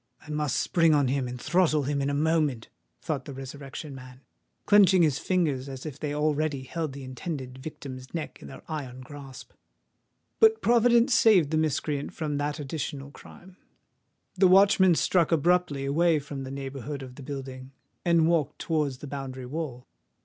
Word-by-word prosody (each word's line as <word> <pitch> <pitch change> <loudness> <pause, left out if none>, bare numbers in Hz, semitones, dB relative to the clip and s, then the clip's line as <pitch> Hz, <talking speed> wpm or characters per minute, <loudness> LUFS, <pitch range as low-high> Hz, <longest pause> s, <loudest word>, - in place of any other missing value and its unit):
"I 150 - -8
must 150 -3 -1
spring 165 -2 +3
upon 140 -3 +3
him 135 -1 0
and 125 0 -6
throttle 155 0 +2
him 140 +1 -1
in 140 - 0
a 140 - -1
moment," 150 -6 0 0.3
thought 145 -5 -3
the 140 - -8
Resurrection 135 +2 -8
Man, 130 0 -12 0.4
clenching 195 -3 +6
his 150 -4 +2
fingers 150 -8 0
as 135 +1 -8
if 145 -2 -7
they 150 -2 -3
already 150 -1 0
held 155 +1 -4
the 140 0 -8
intended 130 0 -6
victim's 130 -3 -8
neck 165 -3 -6
in - - -10
their 65 -1 -11
iron 130 -5 -6
grasp. 135 -2 -11 0.9
But 445 0 +6
Providence 240 +2 +4
saved 210 - +5
the 155 - +1
miscreant 150 -2 -1
from 150 -3 -2
that 145 +1 -2
additional 140 -1 -5
crime:—the 185 +2 -5
watchman 190 -1 +6
struck 170 0 +2
abruptly 165 -3 +2
away 160 +4 +3
from 140 -2 -6
the - - -7
neighbourhood 135 0 -6
of 130 -1 -10
the 135 - -12
building, 130 -1 -7 0.3
and 170 -2 +3
walked 155 -4 +1
towards 150 -5 -1
the 145 - -9
boundary 135 -2 -6
wall. 130 -3 -5
145 Hz, 165 wpm, -27 LUFS, 135-165 Hz, 0.9 s, clenching